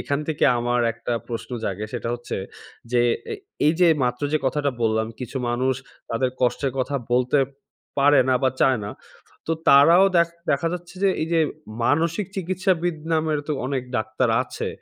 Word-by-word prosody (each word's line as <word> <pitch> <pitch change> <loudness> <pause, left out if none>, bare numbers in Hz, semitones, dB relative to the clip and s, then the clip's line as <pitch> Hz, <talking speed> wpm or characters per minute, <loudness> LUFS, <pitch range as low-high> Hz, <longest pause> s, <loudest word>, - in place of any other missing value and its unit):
এখান 140 0 -1
থেকে 155 - +1
আমার 120 +1 +1
একটা 115 +1 -5 0.2
প্রশ্ন 115 -1 -5
জাগে, 100 +2 -3
সেটা - - -3
হচ্ছে 120 0 -5 0.6
যে, 120 - +4 0.3
এ - - -2 0.3
এই 155 - +5
যে, 175 - +6 0.2
মাত্র 125 +2 -2
যে, 155 - +3
কথাটা 145 +1 0
বললাম, 110 0 +1
কিছু 125 +2 -6
মানুষ 130 +2 +1 0.4
তাদের 125 +2 0
কষ্টের 125 +2 +1
কথা 135 +2 -1 0.2
বলতে 125 +3 +3 0.6
পারে 140 0 +6
না 130 - +4
বা 130 - +3
চায় 130 -3 +4
না। 105 - -5 0.6
তো 165 - 0 0.2
তারাও 165 +7 +7
দেখ 170 0 +4 0.2
দেখা 140 +4 +1
যাচ্ছে 175 +1 -7
যে, 195 - +5
এই - - -1
যে, 165 - +4 0.4
মানসিক 165 - +1
চিকিৎসাবিদ 180 -2 0 0.2
নামের 155 -1 +1
তো - - +1
অনেক 135 -1 -1
ডাক্তার 110 +3 0
আছে, - - -5
140 Hz, 170 wpm, -23 LUFS, 120-165 Hz, 0.6 s, তারাও